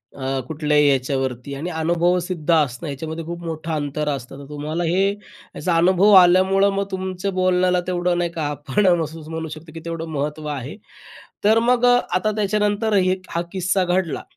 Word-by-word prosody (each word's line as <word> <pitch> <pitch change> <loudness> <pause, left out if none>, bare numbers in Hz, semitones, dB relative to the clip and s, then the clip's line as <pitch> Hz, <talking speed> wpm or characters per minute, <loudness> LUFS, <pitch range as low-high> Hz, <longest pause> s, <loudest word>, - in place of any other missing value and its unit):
अ, 140 - -11 0.3
कुठल्याही 150 -1 +2
याच्यावरती 130 -1 -1
आणि 160 +6 -4
अनुभवसिद्ध 175 +1 0
असणं 150 -1 +1
याच्यामध्ये 160 +4 -5
खूप 170 +1 -6
मोठं 165 0 -5
अंतर 150 0 -2
असतं. 135 -1 -5
तर 140 0 -11
तुम्हाला 150 +3 -3
हे 180 +4 +2 0.5
याचा 180 -2 -1
अनुभव 185 +4 +4
आल्यामुळं 190 +2 +4
मग 200 - 0
तुमच्या 190 +1 -3
बोलण्याला 185 -1 +2
तेवढं 175 -1 0
नाही 175 -1 0
का, 160 -3 -3
आपण 145 +7 0
असं 160 0 -7
म्हणू 160 0 -4
शकतो, 155 +1 -10
की 165 - -7
तेवढं 165 -1 -4
महत्त्व 150 +2 -3
आहे. 135 +3 -7 0.7
तर 220 +2 +5
अ, - - +5
मग 245 0 +3
आता 220 -4 +2
त्याच्यानंतर 210 +1 0
हे 185 0 +2
हा 170 - -1
किस्सा 190 0 0
घडला. 180 -2 -1
170 Hz, 165 wpm, -21 LUFS, 150-185 Hz, 0.7 s, तर